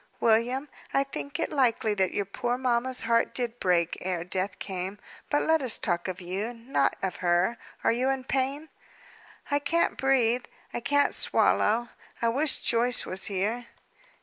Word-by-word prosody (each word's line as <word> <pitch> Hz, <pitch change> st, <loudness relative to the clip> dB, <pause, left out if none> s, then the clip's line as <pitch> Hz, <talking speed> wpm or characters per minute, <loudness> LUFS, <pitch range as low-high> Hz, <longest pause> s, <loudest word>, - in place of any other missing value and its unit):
"William, 235 Hz, +5 st, +2 dB, 0.3 s
I 275 Hz, -, +4 dB
think 280 Hz, +1 st, -6 dB
it -, -, -1 dB
likely 235 Hz, -6 st, +2 dB
that 190 Hz, -2 st, +1 dB
your 200 Hz, -, -1 dB
poor 240 Hz, +5 st, -2 dB
mamma's 255 Hz, 0 st, 0 dB
heart 230 Hz, 0 st, +1 dB
did 240 Hz, -1 st, -2 dB
break, 175 Hz, -2 st, +2 dB
ere 180 Hz, -2 st, -2 dB
death 185 Hz, +2 st, -2 dB
came. 190 Hz, +1 st, -5 dB, 0.3 s
But 290 Hz, -, +2 dB
let 320 Hz, -1 st, +3 dB
us 255 Hz, -4 st, +2 dB
talk 175 Hz, -2 st, -1 dB
of 185 Hz, 0 st, -4 dB
you, 195 Hz, +7 st, -4 dB
not 230 Hz, -, 0 dB
of 190 Hz, -2 st, -2 dB
her. 180 Hz, +6 st, +1 dB, 0.2 s
Are -, -, +4 dB
you 250 Hz, +3 st, +1 dB
in 270 Hz, -1 st, -1 dB
pain?" 275 Hz, +4 st, -1 dB, 0.8 s
"I 285 Hz, -, +3 dB
can't 330 Hz, +4 st, 0 dB
breathe; 250 Hz, -3 st, +2 dB, 0.3 s
I -, -, -2 dB
can't 285 Hz, +4 st, +2 dB
swallow. 235 Hz, +3 st, +3 dB, 0.3 s
I 230 Hz, -, +2 dB
wish 280 Hz, +5 st, +3 dB
Joyce 240 Hz, +1 st, +3 dB
was 185 Hz, +1 st, -1 dB
here." 215 Hz, +5 st, -1 dB
235 Hz, 165 wpm, -27 LUFS, 195-260 Hz, 0.8 s, I